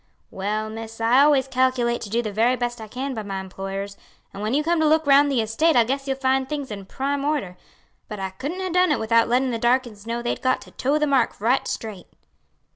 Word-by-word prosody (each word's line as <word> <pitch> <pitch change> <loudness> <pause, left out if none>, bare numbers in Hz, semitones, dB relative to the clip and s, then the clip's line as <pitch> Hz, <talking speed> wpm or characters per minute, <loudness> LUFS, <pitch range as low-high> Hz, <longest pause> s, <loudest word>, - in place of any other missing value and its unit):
"Well, 210 +3 -2
miss, 225 0 -8
I 230 +3 +4
always 285 -2 +4
calculate 255 -2 +1
to 205 - -6
do 235 +3 0
the 215 - -3
very 230 +5 +2
best 240 -1 -3
I 220 - -7
can 260 +5 -4
by 220 - -4
my 195 -2 -5
employers, 195 +1 -6 0.4
and 200 - -7
when 215 +5 -1
you 300 - +2
come 340 +1 +1
to 315 - +3
look 315 +1 +3
round 285 0 +5
the 255 -4 +2
estate, 245 +9 +1
I 240 - +6
guess 270 +4 -3
you'll 270 -1 -1
find 265 0 +1
things 285 -5 -4
in 200 -2 -7
prime 275 +4 -2
order; 285 -12 -1 0.5
but 210 - -7
I 190 -1 -3
couldn't 315 - -4
ha' 355 - -4
done 360 -2 +4
it 295 - +2
without 230 +1 +2
lettin' 255 +2 +2
the 230 - -2
darkies 235 -3 0
know 235 +1 -3
they'd 240 - -2
got 255 0 +1
to - - -14
toe 280 +4 0
the 300 - +1
mark 270 -5 +1
right 240 +6 +1
straight." 210 -5 -5
245 Hz, 240 wpm, -23 LUFS, 220-275 Hz, 0.5 s, I